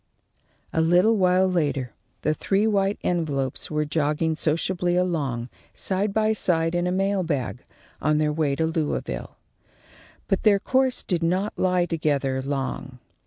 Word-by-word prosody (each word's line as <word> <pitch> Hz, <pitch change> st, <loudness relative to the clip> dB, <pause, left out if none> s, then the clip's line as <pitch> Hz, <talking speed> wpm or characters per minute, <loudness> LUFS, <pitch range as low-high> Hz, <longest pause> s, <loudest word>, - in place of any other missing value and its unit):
A 160 Hz, -, +2 dB
little 180 Hz, +7 st, +4 dB
while 185 Hz, -1 st, +3 dB
later 145 Hz, -9 st, -1 dB, 0.3 s
the 155 Hz, -, +2 dB
three 195 Hz, +6 st, +1 dB
white 200 Hz, -2 st, +1 dB
envelopes 145 Hz, -7 st, -1 dB
were 150 Hz, 0 st, 0 dB
jogging 150 Hz, +1 st, 0 dB
sociably 175 Hz, +3 st, 0 dB
along, 145 Hz, -10 st, -1 dB, 0.3 s
side 195 Hz, +2 st, -1 dB
by 220 Hz, +1 st, +2 dB
side 165 Hz, -5 st, +1 dB
in 175 Hz, 0 st, 0 dB
a -, -, 0 dB
mail 195 Hz, +1 st, +1 dB
bag, 140 Hz, -7 st, -3 dB, 0.4 s
on 150 Hz, +1 st, +2 dB
their 150 Hz, 0 st, +1 dB
way 150 Hz, -3 st, 0 dB
to 160 Hz, -, 0 dB
Louisville. 155 Hz, -, -3 dB, 0.9 s
But 195 Hz, -, +1 dB
their 210 Hz, -2 st, +5 dB
course 260 Hz, +5 st, +1 dB
did 175 Hz, -3 st, -1 dB
not 185 Hz, +5 st, 0 dB
lie 180 Hz, -1 st, +2 dB
together 145 Hz, -5 st, 0 dB
long. 135 Hz, -1 st, -4 dB
165 Hz, 145 wpm, -24 LUFS, 150-190 Hz, 0.9 s, their